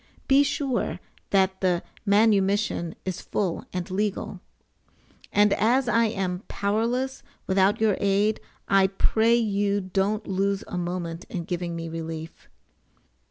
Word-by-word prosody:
[Be 275 +1 +6
sure 280 -2 -1 0.3
that 190 -1 +2
the 180 -2 +1 0.2
manumission 200 -4 +2
is 185 -1 -3
full 190 -5 -2
and 180 0 -4
legal.] 205 +1 -2 0.9
And 205 0 +4
as 240 +6 +2
I 230 -1 +3
am 190 -4 -2
powerless 235 +6 -1 0.2
without 195 +3 +2
your 215 -3 +2
aid, 200 +2 +2 0.3
I 195 -1 +5
pray 220 +4 +2
you 205 -3 +1
don't 195 +3 -1
lose 195 +1 0
a - - -6
moment 175 -1 -3
in 175 - -4
giving 175 0 -3
me 165 0 -5
relief. 160 0 -7
195 Hz, 125 wpm, -25 LUFS, 180-215 Hz, 0.9 s, Be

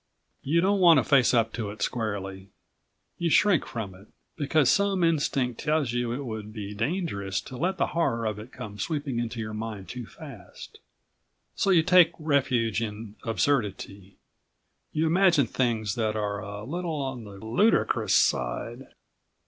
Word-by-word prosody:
You 165 +5 +2
don't 200 +2 +2
want 170 -4 +7
to 130 - +4
face 135 -4 +4
up 115 -2 +2
to 110 -3 -3
it 105 +1 -5
squarely, 100 -4 -3 0.7
you 170 - +1
shrink 190 -1 +3
from 110 -6 -5
it, 95 +3 -16 0.3
because 145 -2 +2
some 200 -2 +2
instinct 140 -7 +1
tells 150 -4 0
you 120 -1 -1
it 135 +3 -4
would 110 -2 -6
be 105 -2 -6
dangerous 110 - -2
to 130 - -10
let 180 +8 -1
the - - +2
horror 115 -9 0
of 105 -1 -2
it 110 +4 -10
come 105 -1 -9
sweeping 145 - -2
into 120 0 -4
your 110 -1 -4
mind 110 -3 -6
too 125 -3 -6
fast. 135 - -12 0.8
So - - 0
you 175 -4 +5
take 175 -1 +6
refuge 130 - +1
in 105 -1 -5
absurdity, 100 -6 -2 0.7
you 155 +2 0
imagine 170 -3 +4
things 115 -4 -1
that 110 -1 -1
are 105 -1 -2
a 100 +1 -7
little 165 +4 -3
on 130 -3 -4
the 100 -1 -11
ludicrous 165 - +2
side. - - 0
120 Hz, 160 wpm, -27 LUFS, 105-155 Hz, 0.8 s, want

